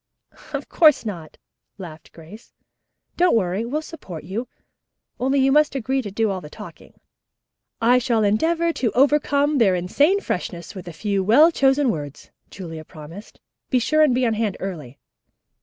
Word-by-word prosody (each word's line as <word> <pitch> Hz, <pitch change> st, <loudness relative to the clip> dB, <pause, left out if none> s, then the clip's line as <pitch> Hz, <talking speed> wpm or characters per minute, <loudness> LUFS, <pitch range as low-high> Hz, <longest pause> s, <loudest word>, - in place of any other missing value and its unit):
"Of -, -, -5 dB
course 305 Hz, -8 st, +4 dB
not," 170 Hz, -7 st, -7 dB, 0.4 s
laughed 170 Hz, -5 st, -11 dB
Grace. 170 Hz, +8 st, -15 dB, 0.6 s
"Don't 355 Hz, -4 st, +3 dB
worry. 190 Hz, 0 st, 0 dB
We'll 300 Hz, +6 st, -3 dB
support 195 Hz, -, -9 dB
you, 215 Hz, +8 st, -5 dB, 0.7 s
only 270 Hz, +2 st, +1 dB
you 270 Hz, 0 st, +3 dB
must 300 Hz, 0 st, +3 dB
agree 265 Hz, +1 st, -1 dB
to 210 Hz, -, -6 dB
do 215 Hz, +1 st, 0 dB
all 190 Hz, -1 st, -4 dB
the 150 Hz, -, -11 dB
talking." -, -, -13 dB, 0.8 s
"I 245 Hz, +2 st, +4 dB
shall 230 Hz, -3 st, 0 dB
endeavor 330 Hz, +11 st, +1 dB
to 235 Hz, -8 st, -1 dB
overcome 285 Hz, +1 st, +2 dB
their 195 Hz, -6 st, +4 dB
insane 285 Hz, -, +2 dB
freshness 175 Hz, -, -5 dB
with 185 Hz, -3 st, -10 dB
a -, -, -6 dB
few 195 Hz, +3 st, -2 dB
well 285 Hz, -, +6 dB
chosen 270 Hz, -3 st, +2 dB
words," 145 Hz, -5 st, -8 dB, 0.2 s
Julia 165 Hz, -4 st, -8 dB
promised. 160 Hz, +5 st, -12 dB, 0.3 s
"Be 255 Hz, -, +2 dB
sure 310 Hz, +6 st, +2 dB
and 290 Hz, -5 st, +4 dB
be 255 Hz, 0 st, +1 dB
on 230 Hz, -, +1 dB
hand 215 Hz, -3 st, -2 dB
early." 155 Hz, -9 st, -7 dB
225 Hz, 160 wpm, -22 LUFS, 180-280 Hz, 0.8 s, well